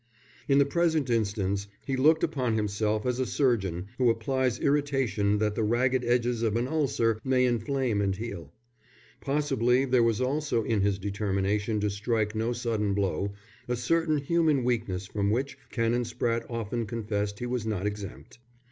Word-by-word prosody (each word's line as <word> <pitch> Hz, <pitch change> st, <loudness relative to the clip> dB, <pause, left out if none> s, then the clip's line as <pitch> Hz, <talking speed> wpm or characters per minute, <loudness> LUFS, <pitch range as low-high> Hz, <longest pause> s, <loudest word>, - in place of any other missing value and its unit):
In 140 Hz, -, +4 dB
the 140 Hz, -, +5 dB
present 160 Hz, -3 st, +1 dB
instance 100 Hz, -3 st, 0 dB, 0.2 s
he 135 Hz, -, -1 dB
looked 155 Hz, +5 st, +4 dB
upon 125 Hz, -5 st, 0 dB
himself 105 Hz, 0 st, 0 dB
as 125 Hz, 0 st, 0 dB
a 130 Hz, -, +1 dB
surgeon 100 Hz, -, 0 dB
who 125 Hz, -2 st, +4 dB
applies 125 Hz, +2 st, 0 dB
irritation 135 Hz, -8 st, +1 dB
that 105 Hz, 0 st, 0 dB
the 110 Hz, -, -2 dB
ragged 125 Hz, +3 st, +2 dB
edges 120 Hz, -1 st, +1 dB
of 110 Hz, -2 st, +1 dB
an 120 Hz, +2 st, 0 dB
ulcer 130 Hz, -7 st, +1 dB
may 130 Hz, -1 st, +3 dB
inflame 120 Hz, -2 st, 0 dB
and 95 Hz, -1 st, 0 dB
heal. 95 Hz, -8 st, -7 dB, 0.7 s
Possibly 135 Hz, -3 st, +1 dB
there 125 Hz, -2 st, +3 dB
was 115 Hz, -1 st, +2 dB
also 130 Hz, -2 st, 0 dB
in 110 Hz, -2 st, 0 dB
his 100 Hz, 0 st, +1 dB
determination 100 Hz, +1 st, -1 dB
to 105 Hz, -1 st, 0 dB
strike 105 Hz, +1 st, -1 dB
no 110 Hz, +2 st, -1 dB
sudden 115 Hz, -4 st, -1 dB
blow, 100 Hz, 0 st, -1 dB, 0.3 s
a 125 Hz, -, 0 dB
certain 155 Hz, +6 st, +1 dB
human 155 Hz, -2 st, +2 dB
weakness 110 Hz, -6 st, -1 dB
from 100 Hz, +1 st, -1 dB
which 125 Hz, +4 st, -1 dB
Canon 115 Hz, 0 st, +1 dB
Spratte 115 Hz, 0 st, -2 dB
often 115 Hz, -1 st, -3 dB
confessed 105 Hz, -2 st, -2 dB
he 120 Hz, -, -4 dB
was 120 Hz, -2 st, -2 dB
not 105 Hz, -3 st, -2 dB
exempt. 105 Hz, +2 st, -6 dB
115 Hz, 165 wpm, -28 LUFS, 105-130 Hz, 0.7 s, the